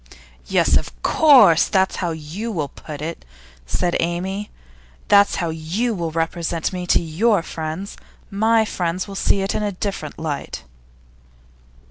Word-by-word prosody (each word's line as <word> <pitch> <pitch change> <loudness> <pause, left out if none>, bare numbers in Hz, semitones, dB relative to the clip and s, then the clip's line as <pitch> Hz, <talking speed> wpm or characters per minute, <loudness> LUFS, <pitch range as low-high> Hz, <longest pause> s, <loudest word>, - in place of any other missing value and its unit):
'Yes, - - +3
of - - -6
course, 245 - +6
that's 190 -1 +1
how 175 - -1
you 165 +8 -5
will 155 -8 -2
put 150 -2 -9
it,' 165 +1 -5 0.4
said 175 - 0
Amy. 185 +4 -2 0.6
'That's 200 0 +5
how 170 -3 -2
you 175 +10 -2
will 170 -5 -3
represent 165 +1 -2
me 180 -1 -4
to - - +4
your 175 +4 +1
friends. 160 +5 -6 0.3
My 220 +2 +3
friends 180 -2 -2
will 200 - -8
see 195 0 +1
it 195 - -1
in - - -1
a 205 -1 -1
different 185 -6 -5
light. 155 - -5
175 Hz, 145 wpm, -21 LUFS, 160-200 Hz, 0.6 s, course